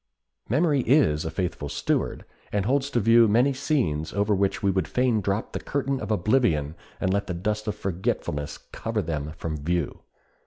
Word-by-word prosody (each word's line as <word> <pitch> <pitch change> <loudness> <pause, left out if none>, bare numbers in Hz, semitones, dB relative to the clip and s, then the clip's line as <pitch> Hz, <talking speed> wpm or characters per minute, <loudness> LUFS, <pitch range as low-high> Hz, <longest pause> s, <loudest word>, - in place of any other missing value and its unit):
Memory 145 +3 +3
is 115 - +3
a - - -1
faithful 80 -4 -3
steward, - - -1 0.3
and 100 -1 0
holds 135 +3 +1
to 125 - +1
view 115 +1 +6
many 120 +6 +3
scenes 125 - -1
over 100 +1 +1
which 100 0 0
we 100 - +3
would 95 -4 0
fain 125 -1 +1
drop 100 +3 -1
the - - -2
curtain 140 -1 -2
of - - -5
oblivion 105 - +2 0.3
and 95 - +1
let 100 0 0
the 90 - -3
dust 105 +4 -2
of 105 - -1
forgetfulness 80 -5 -2
cover - - -2
them 75 -2 -3
from 80 -2 -3
view. 85 +1 -2
100 Hz, 180 wpm, -26 LUFS, 85-125 Hz, 0.3 s, view